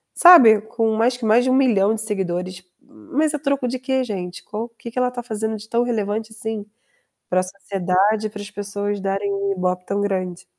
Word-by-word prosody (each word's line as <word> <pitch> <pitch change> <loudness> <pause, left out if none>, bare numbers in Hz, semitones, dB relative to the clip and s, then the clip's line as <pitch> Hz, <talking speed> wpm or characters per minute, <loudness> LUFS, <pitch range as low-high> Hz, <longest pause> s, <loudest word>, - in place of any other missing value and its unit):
sabe, 250 - +8
com 220 +1 -1
mais 240 +3 +1
que 245 - -5
mais 220 +3 +4
de 260 - 0
1.000.000 235 -6 +3
de 215 - -4
seguidores, 185 -3 -3 0.2
mas 295 - -2
a 300 - -2
troco 280 -3 -1
de 255 +1 -3
que, 260 0 0
gente? 185 -6 -6
Qual 225 +2 -5
que 235 0 -11
que 250 - -3
ela 250 0 +1
tá 245 -1 -6
fazendo 220 -1 -3
de 210 +1 -12
tão 235 +1 +1
relevante 220 -2 -2
assim 220 -1 -5 0.6
pra 185 0 +2
sociedade, 195 +2 0
pras 205 0 -8
pessoas 205 0 -4
darem 195 +1 -2
um 200 0 -1
IBOPE 180 -1 -2
tão 200 +1 -1
grande? 185 -3 -3
215 Hz, 195 wpm, -21 LUFS, 195-240 Hz, 0.6 s, sabe